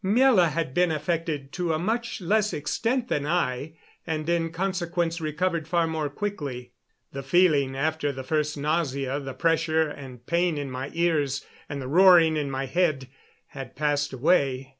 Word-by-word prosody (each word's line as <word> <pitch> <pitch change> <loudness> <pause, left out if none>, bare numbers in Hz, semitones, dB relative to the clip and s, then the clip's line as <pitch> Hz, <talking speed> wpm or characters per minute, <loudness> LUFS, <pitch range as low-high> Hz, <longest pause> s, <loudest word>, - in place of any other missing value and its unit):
Miela 210 -3 +4
had 155 -3 -3
been 175 +1 +2
affected 155 -2 -2
to 175 -1 -1
a - - 0
much 225 +6 -2
less 210 +4 +1
extent 230 - -1
than 145 - -1
I, 155 -3 -1 0.3
and 155 -1 -3
in 170 -1 +1
consequence 175 -2 -2
recovered 160 +1 -1
far 170 0 +2
more 160 -2 -2
quickly. 140 -9 -5 0.4
The 135 - -4
feeling, 140 -2 +3
after 155 +1 -1
the 130 -1 -7
first 150 +1 -1
nausea, 140 -3 -1
the 135 -2 -7
pressure 160 -1 +2
and 130 -5 -10
pain 170 -1 +1
in 140 -2 -4
my 130 +2 -5
ears 155 -5 0 0.2
and 145 - -4
the 130 - -5
roaring 170 0 +6
in 145 -2 -1
my 135 0 -3
head, 150 -4 0 0.4
had 135 -2 -9
passed 145 -1 0
away. 135 -1 +1
155 Hz, 160 wpm, -26 LUFS, 140-175 Hz, 0.4 s, roaring